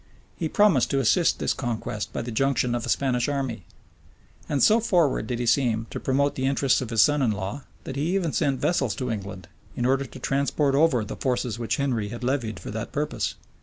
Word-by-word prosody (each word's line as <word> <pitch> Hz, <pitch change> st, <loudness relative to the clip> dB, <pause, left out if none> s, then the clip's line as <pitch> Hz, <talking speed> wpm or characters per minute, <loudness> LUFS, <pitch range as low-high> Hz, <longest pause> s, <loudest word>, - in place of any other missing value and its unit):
He 160 Hz, -, -3 dB
promised 200 Hz, -, +3 dB
to 140 Hz, -, +1 dB
assist 160 Hz, +7 st, +3 dB
this -, -, 0 dB
conquest 115 Hz, -3 st, -4 dB
by -, -, -3 dB
the 120 Hz, -, -5 dB
junction 125 Hz, 0 st, +1 dB
of 120 Hz, -1 st, -2 dB
a -, -, -4 dB
Spanish 125 Hz, -2 st, +1 dB
army. 130 Hz, -, -3 dB, 0.8 s
And 140 Hz, -4 st, +1 dB
so 220 Hz, +2 st, +6 dB
forward 170 Hz, -, +1 dB
did 120 Hz, -, -2 dB
he 120 Hz, -, -2 dB
seem 115 Hz, -3 st, +2 dB
to -, -, -4 dB
promote 140 Hz, +2 st, +1 dB
the 130 Hz, 0 st, -1 dB
interests 135 Hz, -1 st, +2 dB
of 125 Hz, -, -4 dB
his 115 Hz, -3 st, +5 dB
son 145 Hz, -1 st, +2 dB
in 125 Hz, -, +3 dB
law, 105 Hz, +7 st, -4 dB, 0.2 s
that 135 Hz, -, -6 dB
he 160 Hz, +6 st, 0 dB
even 170 Hz, -6 st, 0 dB
sent 135 Hz, -2 st, +1 dB
vessels 135 Hz, -9 st, +1 dB
to 125 Hz, -2 st, -3 dB
England, 100 Hz, -4 st, -6 dB, 0.3 s
in 120 Hz, -, -1 dB
order 135 Hz, +2 st, +2 dB
to 130 Hz, -, -11 dB
transport 140 Hz, +2 st, 0 dB
over 140 Hz, -6 st, +3 dB
the -, -, -7 dB
forces 125 Hz, -3 st, -1 dB
which 115 Hz, -, -1 dB
Henry 125 Hz, -7 st, -1 dB
had 120 Hz, +2 st, -7 dB
levied 120 Hz, -4 st, -1 dB
for -, -, -7 dB
that -, -, -5 dB
purpose. -, -, -2 dB
130 Hz, 215 wpm, -25 LUFS, 115-140 Hz, 0.8 s, so